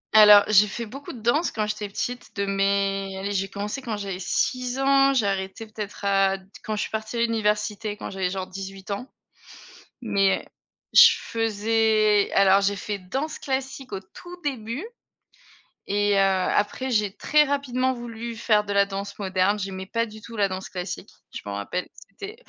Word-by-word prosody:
Alors 210 -1 +9
j'ai 210 0 +6
fait 235 +3 -5
beaucoup 275 +6 -9
de 235 - -10
danse 295 +9 +2
quand 215 -1 -1
j'étais 210 -1 -4
petite 245 +4 -5
de 200 0 -1
mes, 195 0 0
allez 200 +1 -3
j'ai 195 0 -1
commencé 210 +7 -4
quand 230 -4 -4
j'avais 195 -3 -5
6 250 +6 -1
ans, 275 0 +4
j'ai 225 - +2
arrêté 195 +2 -2
peut-être 210 -2 -7
à 195 -1 +3 0.3
quand 215 - -2
je 210 - -2
suis - - -4
partie 220 +2 -4
à - - 0
l'université 210 -2 0
quand - - -6
j'avais 190 -2 -1
genre 190 0 -3
18 195 +1 -8
ans. 225 +7 -5 0.9
Mais 200 -4 +2 0.5
je 475 -1 +9
faisais 220 -1 +2
alors 195 0 +5
j'ai 200 0 +1
fait 205 +1 -4
danse 265 +12 -4
classique 265 -2 -4
au 195 - -2
tout 350 - -12
début 260 - -3 1.0
et 205 0 +2
heu, - - +3
après 195 +6 +1
j'ai 210 -3 +1
très 300 0 +3
rapidement 260 -2 0
voulu 235 -1 -6
faire 210 -2 +2
de 205 - -3
la 200 0 +4
danse 200 0 -6
moderne. 190 +1 +1
J'aimais 190 -1 -5
pas 230 +3 -1
du 215 -1 -11
tout 230 +1 -11
la 200 -2 +2
danse 185 0 -5
classique, 180 0 -6 0.2
je - - -5
m'en 100 - -4
rappelle, 100 - -3 0.2
c'était 410 +2 -9
210 Hz, 180 wpm, -25 LUFS, 195-235 Hz, 1.0 s, Alors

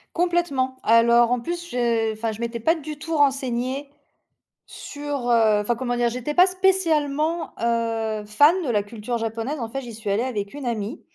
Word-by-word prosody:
Complètement. 335 -7 0
Alors, 235 +1 +5
en 250 - +2
plus, 345 +5 -5
je 230 -2 0
enfin 220 0 -3
je 225 - -9
m'étais 235 0 -3
pas 325 +9 +2
du 305 -1 -7
tout 325 +2 -3
renseignée 270 -1 0 0.8
sur, 285 -4 -5
heu, 220 -3 +4
enfin, 230 +3 0
comment 245 -1 -2
dire? 240 0 +2
J'étais 250 +5 -4
pas 360 +1 +7
spécialement, 330 -4 +1
heu, 225 -2 -1
fan 295 - +4
de - - -3
la 205 -2 +2
culture 225 +3 -5
japonaise. 230 +5 -3
En 230 - -3
fait, 270 +3 -5
j'y 235 -2 -9
suis 215 -2 -5
allée 215 +5 +1
avec 205 -6 -4
une 285 -3 -6
amie 225 +2 -3
245 Hz, 185 wpm, -23 LUFS, 230-295 Hz, 0.8 s, pas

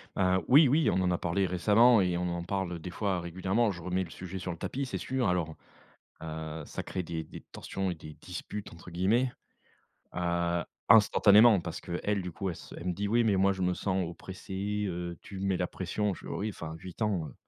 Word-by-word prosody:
Hein, 95 -1 +2
oui, 145 +3 +8
oui, 150 +5 +3
on 95 - +1
en 90 -1 +2
a 90 - +1
parlé 90 +3 0
récemment 105 +6 +5
et 90 -2 +1
on 90 0 -1
en 85 0 -3
parle, 90 -2 -2
des 90 - -7
fois, 95 0 -1
régulièrement, 95 +6 0
je 85 -2 -8
remets 90 +1 -1
le 85 - -9
sujet 95 +3 -7
sur 90 - -4
le 85 - -6
tapis, 135 +10 -3
c'est 125 - -4
sûr. 130 -4 -1
Alors, 85 -3 0 0.7
heu, - - -5
heu, 80 0 -5
ça - - -6
crée 95 - -4
des 80 -1 -4
des - - -11
tensions 95 -1 -3
et - - -4
«des 75 -1 -10
disputes» 95 +3 -6
entre 85 +1 -12
guillemets, 110 +9 +2 0.8
heu, 85 -1 0 0.2
instantanément, 105 0 +7
parce 85 -1 -6
qu'elle, 95 +3 -2
du 90 -1 -6
coup, 95 +4 -3
elle 85 - -6
se - - -12
elle 85 - -7
me 90 - +1
dit: 100 +3 -2
«Oui, 120 +2 +3
mais 100 -3 +3
moi 95 +1 +4
je 95 -1 -4
me 90 0 +2
sens 95 -1 -1
oppressée, 95 +4 -4
heu, 85 -1 -4
tu 100 - -8
me 100 - -1
mets 95 -1 +2
la 90 - 0
pression», 100 +2 -2
je - - -12
fais: - - -13
«Oh - - -3
oui, 110 - -1
enfin, 80 -5 -7
8 90 +3 -11
ans, 95 -7 0
heu, - - -13
95 Hz, 235 wpm, -30 LUFS, 85-100 Hz, 0.8 s, oui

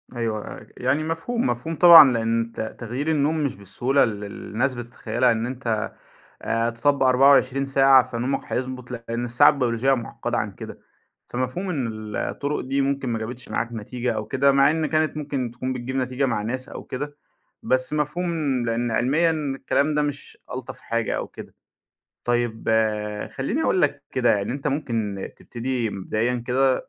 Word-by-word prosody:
أيوه 110 -3 -3
ي 105 - -16 0.2
يعني 135 +5 +2
مفهوم، 165 +10 -2
مفهوم 125 +7 -2
طبعًا، 165 -4 +10
لإن 115 0 0
تَ - - -3 0.2
تغيير 125 +7 -3
النوم 155 +1 +1
مش 140 - -1
بالسهولة 120 +8 +1
ال - - +2
اللي - - -5 0.2
الناس 130 +5 +1
بتتخيلها 120 +1 0
إن 115 0 -1
أنت 120 -4 -2 0.5
آآ، 115 +1 0
تطبق 135 +4 +1
24 135 +1 +4
ساعة 135 -1 +6
فنومك 120 +4 -2
هيضبط 125 -1 -4
لإن 115 0 -4
الساعة 120 +5 +6
البيولوجية 130 -2 +1
معقدة 120 -1 -3
عن 105 -2 -2
كده، - - -9 0.5
فمفهوم 130 +10 -3
إن 140 -9 -1
ال 110 -1 -6
الطرق 145 +1 -2
دي 135 +2 -1
ممكن 135 -1 -1
ما 115 -1 -1
جابتش 120 +3 -7
معاك 115 - -1
نتيجة 120 +2 -3
أو 110 -1 -3
كده 135 +5 +3
مع 140 +1 +5
إن 160 0 0
كانت 155 0 0
ممكن 140 -5 -3
تكون 130 +2 -3
بتجيب 130 +1 -5
نتيجة 130 +1 0
مع 115 -5 -1
ناس 130 +4 -4
أو - - -8
كده، 145 +3 -6 0.5
بس 130 +2 +1
مفهوم 155 +4 -1 0.3
لإن 115 +1 -1
علميًا 150 +9 +2
الكلام 145 -1 0
ده 150 - +3
مش 145 -1 -4
ألطف 130 -1 -6
حاجة 115 0 -2
أو - - -4
كده، - - -12 0.7
طيب 120 -2 -1 0.7
خليني - - -1
أقول - - +2
لك - - 0
كده - - +2
يعني، 100 +3 -2
أنت 140 +2 -5
ممكن 115 -9 -2
تبتدي 120 -1 -3
مبدئيًا 110 +5 -1
كده، 130 +1 +1
130 Hz, 165 wpm, -24 LUFS, 115-140 Hz, 0.7 s, طبعًا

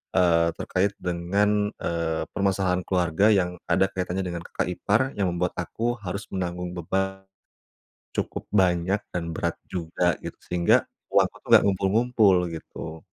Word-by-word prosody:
eee, 85 -2 +4
terkait 95 +2 0
dengan, 100 +4 +1
eee, 80 -1 -1
permasalahan 95 -2 +1
keluarga 90 +1 +2
yang 90 -2 +1
ada 95 +2 +3
kaitannya 90 +1 -2
dengan 85 -1 -4
kakak - - -2
ipar 105 +5 +1 0.2
yang 95 -4 +1
membuat 90 0 -1
aku 120 +7 -2
harus 100 +1 -5
menanggung 90 -1 -3
beban 95 +3 -2 0.9
cukup - - -3
banyak 95 0 +3
dan 85 -2 -3
berat - - -1
juga 90 0 0
gitu. - - -6
Sehingga 85 -1 +3 0.3
uangku - - +3
tu - - -24
nggak - - +8
ngumpul-ngumpul 100 +1 +3 0.2
gitu. 80 0 -8
90 Hz, 135 wpm, -25 LUFS, 85-100 Hz, 0.9 s, nggak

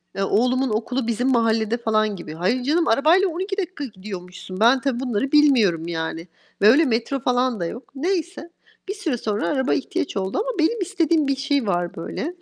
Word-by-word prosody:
e, 195 - -2
oğlumun 250 +6 +1
okulu 230 +3 -2
bizim 240 +3 0
mahallede 225 -1 +1
falan 215 -3 0
gibi. 170 -4 -8
Hayır, 185 +10 0
canım 320 +6 +1
arabayla 315 +11 +4
12 380 +4 -4
dakika 365 -6 -4
gidiyormuşsun. 185 -4 -9
Ben 240 +4 +5
tabii 265 -3 -1
bunları 260 +1 -2
bilmiyorum, 225 - +4
yani, 165 0 -4 0.3
ve 205 - +6
öyle 290 +8 +5
metro 245 +2 -1
falan 250 -2 0
da 170 - -2
yok. 235 +10 -8
Neyse, 345 +2 -2 0.4
bir 395 - -2
süre 345 - -2
sonra 215 -2 -2
araba 265 -2 +1
ihtiyaç 300 - -2
oldu 190 0 -2
ama 465 -4 -3
benim 395 +7 +1
istediğim 335 -5 +1
bir 275 - +1
şey 275 -3 -1
var 175 -2 -1
böyle. 300 - -5
250 Hz, 185 wpm, -22 LUFS, 210-310 Hz, 0.4 s, ve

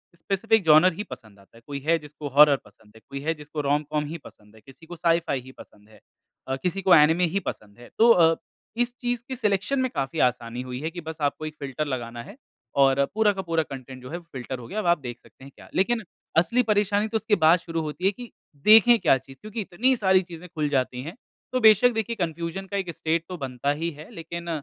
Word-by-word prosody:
Specific 200 +5 +1
genre 160 +3 +6
ही 205 - -5
पसंद 115 - -12
आता 100 +3 -21
है। - - -17
कोई 140 -1 -5
है 165 +1 +4
जिसको 150 0 -9
हॉरर 145 +1 +7
पसंद 105 +1 -22
है, 110 - -16
कोई 140 0 -5
है 160 +3 0
जिसको 150 0 -6
रोम-कॉम 150 +1 0
ही 160 +3 -6
पसंद 105 +1 -16
है, 110 - -18
किसी 135 +7 -17
को 175 +2 -9
साइ-फ़ाई 165 -4 +1
ही 130 +1 -13
पसंद 105 -4 -17
है 110 - -19 0.5
अ, 135 - -1
किसी 185 +2 -1
को 185 -2 +6
एनिमे 160 +4 +5
ही - - +3
पसंद 105 - -8
है। 120 - -13
तो 230 +2 +6
अ, 165 -5 +5 0.4
इस 245 0 0
चीज़ 245 -1 -2
की 260 - -4
सिलेक्शन 215 +3 0
में 260 0 +1
काफ़ी 140 +3 -2
आसानी 120 0 -5
हुई 125 0 -6
है 160 - -2
कि 175 - -7
बस 160 0 -7
आपको 145 +2 -1
एक 155 0 -6
फ़िल्टर 140 +2 -3
लगाना 120 -3 -4
है 200 - -12 0.5
और 135 0 +4
पूरा 215 -1 +4
का 190 - -4
पूरा 165 -3 0
कंटेंट 130 -2 -10
जो 125 - -9
है 170 - -4
वो 175 - -13
फ़िल्टर 130 0 -5
हो 120 - -10
गया। 210 - -4
अब 215 - -3
आप 170 -2 +3
देख 120 -2 -7
सकते - - -20
हैं 135 - -12
क्या? - - -15
लेकिन 225 +4 +1 0.3
असली 235 +9 +3
परेशानी 205 -1 +1
तो 220 +1 -1
उसके 220 -1 +1
बाद 165 +3 +6
शुरू 165 -1 -4
होती 155 +4 -5
है 195 - +5
कि 245 +3 -11 0.3
देखें 225 +2 +7
क्या 135 - +4
चीज़? 135 +1 -15
क्योंकि 215 +1 -5
इतनी 235 +8 +1
सारी 190 -4 +3
चीज़ें 175 -1 -11
खुल 150 -2 0
जाती 130 -3 -1
हैं। 165 +6 -8 0.4
तो 255 - 0
बेशक 220 +2 +7
देखिए 225 +1 -2
कन्फ्यूज़न 170 0 -4
का 200 - -3
एक 190 -3 -3
स्टेट 160 +1 -1
तो 180 - -5
बनता 135 0 -2
ही 160 +4 -2
है 150 +1 -12
लेकिन 170 +1 -7
165 Hz, 240 wpm, -25 LUFS, 135-195 Hz, 0.5 s, हॉरर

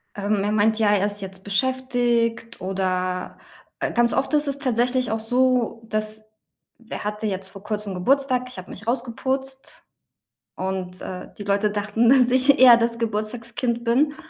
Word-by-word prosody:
Ähm, 205 0 -1
er 205 - 0
meint: 215 +1 +2
„Ja, 210 -2 +3
er 200 0 +2
ist 205 0 -2
jetzt 190 0 -8
beschäftigt.” 240 -1 0
Oder, 185 -1 -2 0.4
äh, - - -1
ganz 240 0 +2
oft 270 +3 -1
ist 295 0 +3
es 280 0 0
tatsächlich 250 -2 +1
auch 220 - -1
so, 245 0 +1
dass 215 0 -2 0.7
er - - -5
hatte 210 +1 -4
jetzt 190 -1 -3
vor 195 +1 -12
kurzem 210 -2 -4
Geburtstag. 255 +6 +1
Ich 250 - -5
habe 185 - -9
mich 220 +4 -11
rausgeputzt 265 +2 -3 0.7
und, 185 -1 -4
äh, 180 -1 -7
die 205 - -6
Leute 200 +1 +1
dachten, 215 +3 +1
dass 255 -2 +5
ich 265 +2 +5
eher 245 -2 +9
das 230 0 0
Geburtstagskind 230 +2 -2
bin 280 +6 +2
225 Hz, 165 wpm, -23 LUFS, 205-250 Hz, 0.7 s, eher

